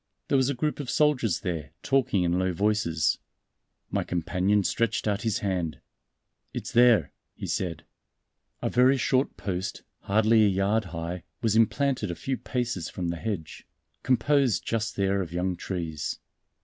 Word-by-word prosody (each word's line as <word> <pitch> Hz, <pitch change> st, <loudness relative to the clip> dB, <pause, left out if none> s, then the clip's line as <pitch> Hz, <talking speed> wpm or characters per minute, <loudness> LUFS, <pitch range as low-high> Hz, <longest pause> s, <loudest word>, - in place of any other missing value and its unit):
There -, -, +3 dB
was 130 Hz, 0 st, +3 dB
a 140 Hz, -, -1 dB
group 150 Hz, +5 st, -1 dB
of 140 Hz, -4 st, -4 dB
soldiers 140 Hz, -, +2 dB
there, 80 Hz, -8 st, -4 dB
talking 120 Hz, -8 st, +2 dB
in 90 Hz, +1 st, +1 dB
low 95 Hz, -1 st, +1 dB
voices. 100 Hz, -5 st, +1 dB, 0.7 s
My -, -, 0 dB
companion 90 Hz, +4 st, +1 dB
stretched 115 Hz, +2 st, 0 dB
out 100 Hz, -1 st, 0 dB
his 110 Hz, -2 st, 0 dB
hand. 85 Hz, -7 st, -1 dB, 0.8 s
"It's -, -, -4 dB
there," 120 Hz, -9 st, +5 dB, 0.2 s
he -, -, -6 dB
said. 85 Hz, -3 st, -2 dB, 0.8 s
A -, -, +1 dB
very 130 Hz, +2 st, +5 dB
short 130 Hz, +1 st, +1 dB
post, 95 Hz, -1 st, -4 dB, 0.2 s
hardly 110 Hz, +2 st, +4 dB
a -, -, +5 dB
yard 100 Hz, +3 st, +1 dB
high, 85 Hz, +1 st, -5 dB, 0.2 s
was 110 Hz, -2 st, +2 dB
implanted 120 Hz, 0 st, +2 dB
a 85 Hz, -, -3 dB
few 135 Hz, +8 st, -2 dB
paces 120 Hz, -11 st, -3 dB
from 90 Hz, -2 st, -3 dB
the 85 Hz, -, -2 dB
hedge, 85 Hz, -6 st, -5 dB, 0.3 s
composed 130 Hz, -, +2 dB
just 110 Hz, -1 st, -1 dB
there 100 Hz, 0 st, +1 dB
of 85 Hz, -4 st, -5 dB
young 90 Hz, +1 st, 0 dB
trees. 85 Hz, -5 st, -4 dB
100 Hz, 155 wpm, -27 LUFS, 90-120 Hz, 0.8 s, there